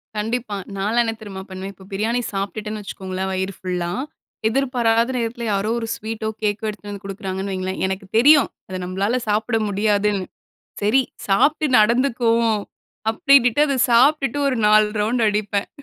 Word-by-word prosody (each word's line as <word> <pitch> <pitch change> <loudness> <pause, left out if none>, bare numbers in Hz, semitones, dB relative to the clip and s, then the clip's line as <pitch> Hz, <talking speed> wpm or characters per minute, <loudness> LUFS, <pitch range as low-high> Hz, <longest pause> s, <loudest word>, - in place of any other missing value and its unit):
கண்டிப்பா! 220 +1 -2 0.2
நான்லாம் 215 +5 +2
என்ன 225 -1 -2
தெரியுமா? 195 -3 -7
பண்ணுவேன், 190 +1 -7
இப்ப 190 0 -16
பிரியாணி 225 +5 0
சாப்பிட்டுட்டேன்னு 210 +2 -4
வச்சுக்கோங்களேன் 190 -1 -5
வயிறு 190 +1 -2
ஃபுல்லா. 180 -2 -3 0.6
எதிர்பாராத 235 -2 +1
நேரத்தில 235 0 -3
யாரோ 200 +2 0
ஒரு 225 - -4
ஸ்வீட்டோ 220 0 -5
கேக்கோ 210 0 -1
எடுத்துட்டு 210 -1 -8
வந்து 200 -1 -8
கொடுக்குறாங்கன்னு 195 0 -4
வைங்களேன், 185 0 -3
எனக்கு 190 +1 -4
தெரியும் 285 +5 +6 0.2
அத 185 - -4
நம்மளால 195 +7 -1
சாப்பிட 220 +3 +1
முடியாதுன்னு. 205 -1 +1 0.6
சரி, 215 +6 +4 0.3
சாப்பிட்டு 290 +10 +3
நடந்துக்குவோம். 230 -1 +2 0.5
அப்படினுட்டு 250 +2 +4
அத 280 - 0 0.2
சாப்பிட்டுட்டு 275 +2 +4
ஒரு 260 -3 0
4 215 0 +5
ரவுண்டு 225 +2 +1
அடிப்பேன்! 205 -1 -1
215 Hz, 140 wpm, -21 LUFS, 195-235 Hz, 0.6 s, தெரியும்